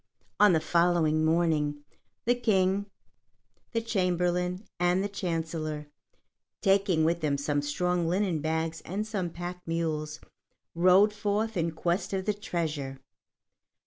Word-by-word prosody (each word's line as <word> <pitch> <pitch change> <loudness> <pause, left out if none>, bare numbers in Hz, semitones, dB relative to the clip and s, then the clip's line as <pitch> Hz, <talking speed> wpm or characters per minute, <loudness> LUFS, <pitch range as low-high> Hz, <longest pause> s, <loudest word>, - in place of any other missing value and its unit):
On 210 -3 +7
the 160 - +4
following 165 -1 +2
morning, 155 -3 +1 0.4
the 240 - +4
King, 200 -4 +1 0.8
the 230 - 0
Chamberlain, 180 -2 0
and 180 +2 +2
the - - 0
Chancellor, 160 -5 -3 0.7
taking 195 -5 +3
with 170 +1 +1
them 145 -2 +1
some 145 +1 0
strong 175 +4 0
linen 180 -2 +1
bags 160 +1 -2
and 200 +5 -3
some 200 -5 -2
pack 175 +2 -6
mules, 155 -2 -2 0.5
rode 185 +5 +5
forth 210 +1 -1
in 170 -2 +1
quest 170 +4 -2
of 190 -1 -1
the 210 - +1
treasure. 155 -9 -3
175 Hz, 125 wpm, -28 LUFS, 160-195 Hz, 0.8 s, On